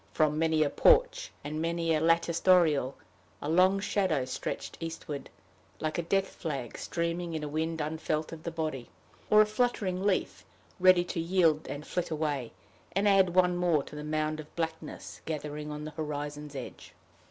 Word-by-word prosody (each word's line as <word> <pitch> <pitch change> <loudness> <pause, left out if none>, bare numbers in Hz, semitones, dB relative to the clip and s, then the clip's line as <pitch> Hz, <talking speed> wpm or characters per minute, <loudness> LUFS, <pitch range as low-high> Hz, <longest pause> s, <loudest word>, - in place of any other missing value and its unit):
From 155 -1 +2
many 160 -1 +3
a 145 - -1
porch, - - +4
and 155 +2 -3
many 165 0 0
a 155 - +1
latticed 165 +1 +2
oriel, 150 -7 +4 0.4
a - - -5
long 185 +5 +4
shadow 190 -9 0
stretched 130 - -4
eastward, 160 -4 -6 0.5
like 155 +2 -2
a - - +2
death 195 +3 +1
flag 140 -8 -5
streaming 170 0 -2
in 155 - -3
a - - -2
wind 160 +2 -2
unfelt 155 0 -2
of 165 -1 -8
the 170 - -4
body 155 -6 -4 0.4
or 215 0 +8
a - - -1
fluttering 210 -4 0
leaf, 200 -2 0 0.4
ready 185 -1 +6
to 175 - -4
yield, 165 -3 +2
and 145 +1 -6
flit 180 - -2
away, 150 -6 -2 0.4
and 195 +2 +2
add 190 -3 +4
one 180 -1 +4
more 175 -5 +2
to - - -11
the 150 - -6
mound 155 0 -1
of 155 0 -10
blackness 160 -1 -5
gathering 150 -1 -4
on 150 0 -5
the 155 - -6
horizon's 150 -1 -5
edge. 130 - -8
160 Hz, 175 wpm, -30 LUFS, 150-180 Hz, 0.5 s, or